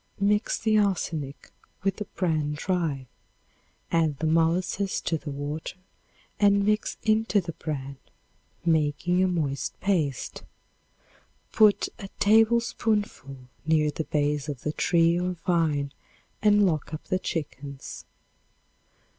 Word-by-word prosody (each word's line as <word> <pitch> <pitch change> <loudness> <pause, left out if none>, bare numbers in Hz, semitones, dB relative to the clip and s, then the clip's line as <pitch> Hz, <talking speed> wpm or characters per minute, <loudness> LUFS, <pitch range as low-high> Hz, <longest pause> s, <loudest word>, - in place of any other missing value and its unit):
Mix 205 +1 +2
the 220 -1 +2
arsenic 165 -8 -2 0.3
with 195 0 0
the 210 - -4
bran 155 -7 -1
dry. 155 -4 -1 0.9
Add 160 -4 +2
the 160 - -2
molasses 170 +5 +1
to 165 - -1
the 155 -1 -5
water 145 +5 -5 0.6
and 200 -1 +4
mix 210 +1 0
into 220 -1 +3
the 170 -3 -4
bran, 140 -4 -5 0.7
making 160 +2 +2
a - - +3
moist 150 -6 -2
paste. 160 -10 -1 1.1
Put 215 -2 +5
a 195 - -7
tablespoonful 215 - +2 0.3
near 155 -1 +2
the 160 - -4
base 145 0 0
of 140 -4 -5
the 150 - -1
tree 170 +1 +3
or 180 +1 -1
vine 155 -5 +1 0.5
and 205 -1 +5
lock 155 -3 -1
up 155 - -9
the 185 - -1
chickens. 145 -5 -5
165 Hz, 120 wpm, -26 LUFS, 150-200 Hz, 1.1 s, Put